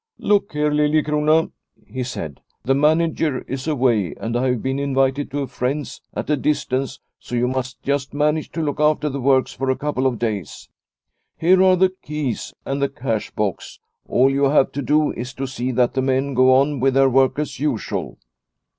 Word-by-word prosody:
" 460 Hz, -, -67 dB, 0.2 s
Look 200 Hz, -3 st, +1 dB
here, 150 Hz, 0 st, +1 dB
Liliecrona," 150 Hz, +1 st, +2 dB, 0.3 s
he 130 Hz, -, -6 dB
said, 80 Hz, -, -5 dB
" -, -, -50 dB
the 135 Hz, -, +3 dB
manager 155 Hz, -1 st, +1 dB
is 135 Hz, +2 st, -6 dB
away 120 Hz, -, +1 dB
and 115 Hz, +1 st, -4 dB
I 130 Hz, +2 st, +1 dB
have 125 Hz, -3 st, -1 dB
been 135 Hz, +1 st, -1 dB
invited 135 Hz, 0 st, 0 dB
to 145 Hz, +1 st, -3 dB
a -, -, -5 dB
friend's 135 Hz, +4 st, -3 dB
at -, -, -3 dB
a -, -, +4 dB
distance, 135 Hz, -2 st, -1 dB, 0.2 s
so 125 Hz, -, -6 dB
you 120 Hz, +1 st, +1 dB
must 130 Hz, 0 st, -3 dB
just 140 Hz, -1 st, -1 dB
manage 150 Hz, +1 st, 0 dB
to 165 Hz, -, -2 dB
look 145 Hz, -2 st, -2 dB
after 150 Hz, 0 st, +2 dB
the 140 Hz, -1 st, -4 dB
works 130 Hz, 0 st, +2 dB
for 135 Hz, 0 st, -3 dB
a 130 Hz, -, +2 dB
couple 135 Hz, -1 st, -1 dB
of 125 Hz, -3 st, -1 dB
days. 105 Hz, -8 st, -4 dB, 0.7 s
Here 185 Hz, +3 st, +4 dB
are 185 Hz, -1 st, +6 dB
the 185 Hz, +1 st, +2 dB
keys 150 Hz, -5 st, -4 dB
and 140 Hz, +1 st, -2 dB
the 140 Hz, -, +1 dB
cash 125 Hz, -7 st, -3 dB
box; 105 Hz, -3 st, -3 dB, 0.3 s
all 130 Hz, +2 st, +3 dB
you 140 Hz, +1 st, +2 dB
have 140 Hz, -1 st, +3 dB
to 140 Hz, -, -4 dB
do 150 Hz, +4 st, +2 dB
is 125 Hz, +2 st, -6 dB
to 135 Hz, -, -3 dB
see 130 Hz, -1 st, -3 dB
that 120 Hz, 0 st, +2 dB
the 130 Hz, -, 0 dB
men 135 Hz, +1 st, 0 dB
go 130 Hz, +1 st, +5 dB
on 140 Hz, +2 st, +3 dB
with 135 Hz, +1 st, +2 dB
their 135 Hz, 0 st, +5 dB
work 130 Hz, +1 st, +3 dB
as 150 Hz, -3 st, -3 dB
usual." 140 Hz, -7 st, -2 dB
135 Hz, 200 wpm, -21 LUFS, 130-150 Hz, 0.7 s, are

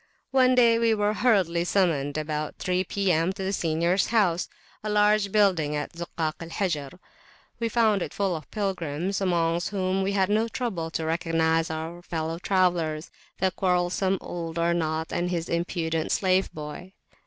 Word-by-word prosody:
One 255 Hz, -1 st, +4 dB
day 235 Hz, -2 st, +5 dB
we 230 Hz, -1 st, +3 dB
were 210 Hz, 0 st, +1 dB
hurriedly 190 Hz, -8 st, +2 dB
summoned 160 Hz, -7 st, +1 dB
about 155 Hz, 0 st, -3 dB
three 185 Hz, 0 st, 0 dB
P.M. 185 Hz, -2 st, +1 dB
to 190 Hz, 0 st, -6 dB
the 190 Hz, +1 st, -1 dB
seniors 170 Hz, +2 st, +1 dB
house, 190 Hz, -7 st, +2 dB, 0.3 s
a 215 Hz, -, -3 dB
large 210 Hz, -1 st, +3 dB
building 180 Hz, -8 st, +2 dB
in 150 Hz, -, -3 dB
the 170 Hz, 0 st, -6 dB
Zukak 160 Hz, -1 st, -3 dB
al 165 Hz, -, -7 dB
Hajar. 170 Hz, -4 st, -2 dB, 0.6 s
We 230 Hz, -1 st, 0 dB
found 220 Hz, -4 st, +2 dB
it -, -, -3 dB
full 195 Hz, -3 st, -1 dB
of 155 Hz, -2 st, -8 dB
pilgrims, 190 Hz, -2 st, -2 dB
amongst 170 Hz, -2 st, +1 dB
whom 190 Hz, -1 st, 0 dB
we 195 Hz, +1 st, 0 dB
had 190 Hz, -1 st, +2 dB
no 220 Hz, +2 st, +2 dB
trouble 215 Hz, -9 st, -3 dB
to 160 Hz, -1 st, -3 dB
recognise 165 Hz, 0 st, +1 dB
our 160 Hz, +2 st, -5 dB
fellow 165 Hz, -1 st, -3 dB
travellers, 175 Hz, -5 st, 0 dB, 0.3 s
the 190 Hz, 0 st, +1 dB
quarrelsome 185 Hz, +1 st, +1 dB
old 165 Hz, -1 st, -5 dB
Arnaut 165 Hz, -1 st, 0 dB
and 175 Hz, +1 st, 0 dB
his 170 Hz, -2 st, -2 dB
impudent 170 Hz, -2 st, -1 dB
slave 190 Hz, 0 st, +2 dB
boy. 155 Hz, +5 st, -8 dB
175 Hz, 165 wpm, -26 LUFS, 165-195 Hz, 0.6 s, day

